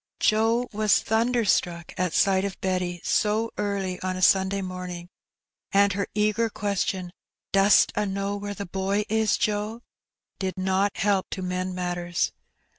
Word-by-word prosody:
Joe 225 +3 +2
was 210 0 +3
thunderstruck 220 -7 0
at 180 -2 -1
sight 195 -1 +3
of 200 -1 -4
Betty 180 -2 -2
so 220 +2 +1
early 195 -3 -2
on 185 0 -2
a - - -5
Sunday 190 +1 +3
morning, 180 -1 -6 0.6
and 200 0 +4
her 200 +1 -2
eager 215 +2 +1
question, 190 -3 -2 0.4
"Dost 195 +2 +5
a' 210 0 0
knaw 200 +1 -2
where 205 0 -5
the 200 - -5
boy 195 +3 -1
is, 220 0 +2
Joe?'^ 215 +2 -1 0.6
did 190 -1 -3
not 190 +2 0
help 195 -2 +1
to 190 - -5
mend 185 0 -2
matters. 175 -1 -1
195 Hz, 145 wpm, -25 LUFS, 185-210 Hz, 0.6 s, Dost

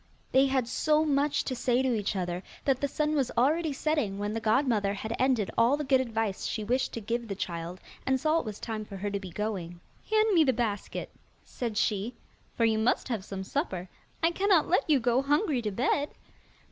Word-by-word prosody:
They 270 +1 +5
had 260 -3 +1
so 305 +5 +2
much 285 -1 +2
to 260 - -3
say 250 +1 +1
to 260 -2 +2
each 210 -2 -1
other, 180 -1 -2 0.2
that 270 -2 +2
the 285 - +2
sun 300 +2 0
was 275 -5 +1
already 310 +6 +3
setting 275 -8 0
when 205 +1 -2
the 225 - -1
godmother 220 -3 +2
had 220 +3 -4
ended 255 -6 +2
all 240 +5 +4
the 300 - -2
good 265 -2 +3
advice 225 -5 -2
she 215 - -3
wished 255 +5 0
to 230 - -4
give 235 +2 -2
the 200 - -4
child, 170 -1 -4 0.2
and 265 0 +1
saw 310 +4 +2
it - - -5
was 215 -2 -6
time 220 -2 -4
for 200 -2 -9
her 205 +2 -3
to 200 - -1
be 190 -2 -8
going. 175 -3 -4 0.3
'Hand 435 0 +3
me 330 -3 +6
the 265 -3 +3
basket,' 220 -4 -3 0.3
said 230 -4 -4
she, 210 +3 0 0.4
'for 230 - +3
you 220 -1 +2
must 230 +3 +1
have 225 -6 -2
some 190 0 -5
supper. 190 - -3 0.4
I 330 - +4
cannot 380 -3 +3
let 360 - +2
you 290 -3 +5
go 245 +1 +2
hungry 290 - +1
to 215 -2 -2
bed. 270 +7 +1
240 Hz, 215 wpm, -29 LUFS, 210-280 Hz, 0.4 s, me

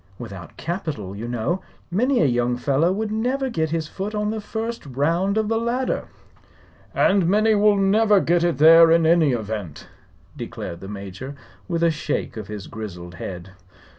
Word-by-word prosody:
Without 100 -7 -9
capital, 155 - -4
you 110 +4 -5
know, 120 +10 -1 0.3
many 245 +8 +2
a - - +4
young 120 -1 +1
fellow 140 +7 +2
would 210 +2 -2
never 255 +4 -1
get 160 -5 -1
his 160 -1 -2
foot 200 +5 -5
on 210 0 0
the 220 -1 -4
first 225 +3 -4
round 165 - 0
of 220 -1 +1
the 225 +1 +1
ladder." 240 +3 -1 0.9
"And 190 -3 +3
many 215 +4 +3
will 210 0 +4
never 205 +1 +4
get 175 -1 +2
it 175 -5 +1
there 165 +2 +8
in 165 0 +4
any 160 -3 +4
event," 105 - -5 0.5
declared 85 - -6
the 95 - -9
Major, 100 +7 -7 0.3
with 170 -2 -1
a 170 - +4
shake 155 -1 -3
of 110 -3 -7
his 105 -2 -7
grizzled 90 -5 -8
head. 90 +1 -7
165 Hz, 170 wpm, -23 LUFS, -, 0.9 s, there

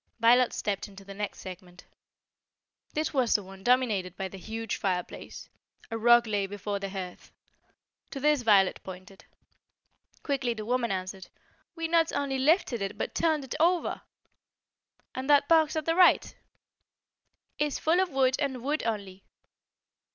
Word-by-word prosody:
Violet 240 +2 +5
stepped 200 -2 -3
into 195 -1 -14
the 200 - -9
next 205 +1 -5
segment. 180 -1 -11 1.1
This 310 +1 -1
was 255 -5 +2
the 205 - +2
one 190 0 -13
dominated 220 -8 +1
by 190 0 -3
the 195 - -10
huge 225 +2 -4
fire 180 -2 0
place. - - -11 0.4
A 225 - -2
rug 240 +1 +6
lay 205 -3 -1
before 205 0 -4
the 195 0 -4
hearth. 185 -2 -7 0.8
To 275 - -6
this 295 -1 +2
Violet 200 -5 +4
pointed. 185 +1 -11 1.0
Quickly 265 -5 -1
the 215 -1 -6
woman 240 -1 0
answered: 185 0 -5 0.5
"We 330 -1 -2
not 330 0 +2
only 275 -2 -1
lifted 270 - +2
it, 195 +2 -4
but - - -3
turned 315 -3 +1
it 265 - -6
over." 345 +2 +1 1.1
"And 260 +2 -5
that 285 -1 +5
box 320 -2 +4
at 310 -1 -2
the 330 - +2
right?" 360 +1 +4 1.3
"Is 295 -1 0
full 330 +3 +2
of 375 -1 +2
wood 265 -3 +2
and 265 -4 -2
wood 295 +3 0
only." 200 -4 -4
235 Hz, 155 wpm, -28 LUFS, 195-285 Hz, 1.3 s, rug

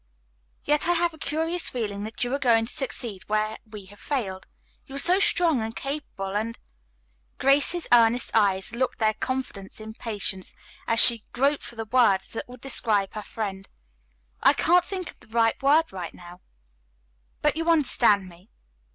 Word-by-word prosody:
"Yet 295 +2 0
I 350 - +3
have 345 0 0
a 315 - -15
curious 325 +5 -1
feeling 205 -4 -4
that 220 +2 -5
you 245 +1 -3
are 280 - -1
going 230 -4 +3
to 235 - -8
succeed 240 -8 -4
where 215 +1 -1
we 210 -2 -10
have 205 +2 -17
failed. 195 -10 -4 0.4
You 270 - -10
are - - -4
so 355 +7 +4
strong 335 - +4
and 225 +1 -5
capable 275 -9 -5
and 225 +2 -3 0.4
" - - -42
Grace's 285 +5 +3
earnest 235 +1 +4
eyes 195 -3 +2
looked 255 +2 -2
their 220 -1 +1
confidence 220 -5 -5
in 220 0 -9
Patience, 205 -4 -2 0.3
as 230 - +2
she 230 -3 +7
groped 275 +3 +1
for 235 - -9
the 225 -1 -5
word 215 -5 +3
that 225 - -6
would 250 -1 -12
describe 215 -7 +1
her 215 - -5
friend. 195 -3 -6 0.7
"I - - +5
can't 350 +2 +3
think 370 -1 -6
of - - -30
the - - -19
right 225 +2 +1
word 295 +4 +4 0.3
now, 175 +1 -14 1.0
but 300 -1 +2
you 330 +1 -2
understand 240 - +3
me. 180 +4 -17
230 Hz, 175 wpm, -25 LUFS, 205-280 Hz, 1.0 s, she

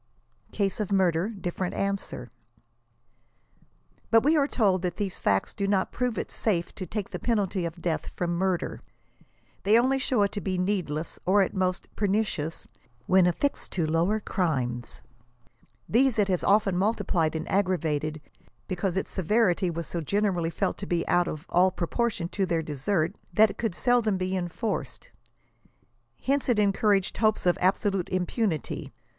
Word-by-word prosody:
"CASE 200 0 -1
OF 210 -2 -2
MURDER 185 -1 +2
DIFFERENT." 185 -3 -4
ANSWER. 195 - -3 1.8
But 225 0 +5
we 305 +4 +4
are 285 -2 +3
told 195 -9 +2
that 180 -2 -3
these 200 -3 -3
facts 95 -1 +1
do 200 - -2
not 195 -2 +1
prove 250 -2 -1
it - - -3
safe 175 -6 -1
to 185 - -6
take 205 +2 -4
the 180 - -4
penalty 200 -5 0
of 170 +1 -6
death 165 -3 -1
from 175 -1 -1
mvrder. 185 -2 -1 0.8
They 210 +3 +5
only 260 +3 +3
show 250 -5 +2
it 200 - +1
to 205 - -4
be 185 -2 -2
needless, 180 -5 -2
or, 195 +3 +4
at - - -3
most, 185 -1 -1
pernicious, 195 -6 -1 0.4
when 185 -1 +5
affixed 280 +11 -1
to 170 -4 0
lower 170 +7 +1
crimes. 130 - -1 0.8
These 255 +1 +3
it 205 -2 +2
has 180 -2 +1
often 200 -2 +3
multiplied 185 -6 +1
and 160 +1 -3
aggravated, 155 -6 0 0.5
because 185 -1 -1
its 190 - -2
se 190 - -3
verity 185 -1 +2
was 165 0 -4
so 170 - -4
generally 185 -1 0
felt 165 - -2
to 200 - -5
be 175 -1 -1
out 175 0 +3
of 155 +2 -5
all 180 +2 +4
proportion 190 +1 -1
to 195 0 -1
their 165 -2 0
desert, 155 +3 -1 0.2
that 215 +2 +5
it 200 - -14
could 225 -7 -1
seldom 235 -5 +2
be 185 +1 -1
enforced; 180 - -3 1.1
hence 275 0 +1
it 240 - +3
encouraged 200 -1 +2
hopes 215 -3 +2
of 175 - +4
absolute 195 0 +1
impunity. 185 - -2
190 Hz, 160 wpm, -27 LUFS, 170-210 Hz, 1.8 s, But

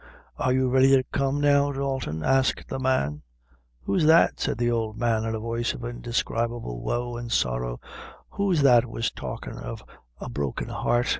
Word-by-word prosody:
Are 130 - +1
you 130 0 +2
ready 130 +1 +5
to 130 - +3
come 135 +2 -1
now, 145 0 +4
Dalton?" 135 - -3
asked 135 0 +1
the 135 - -3
man. 75 - 0 0.6
"Who's 100 - +1
that," 165 +1 +5
said - - -1
the 120 0 +1
old 110 -2 -2
man, 115 -2 +1
in 110 0 -2
a - - -3
voice 115 +1 -2
of 120 - -7
indescribable 120 - -3
woe 120 - -2
and 120 -1 -6
sorrow; - - 0 0.5
"who's 190 -7 +1
that 125 -3 +6
was 115 0 -2
talkin' - - -7
of - - -7 0.4
a - - -6
broken 70 +1 -3
heart? 120 0 0
120 Hz, 170 wpm, -25 LUFS, 110-135 Hz, 0.6 s, that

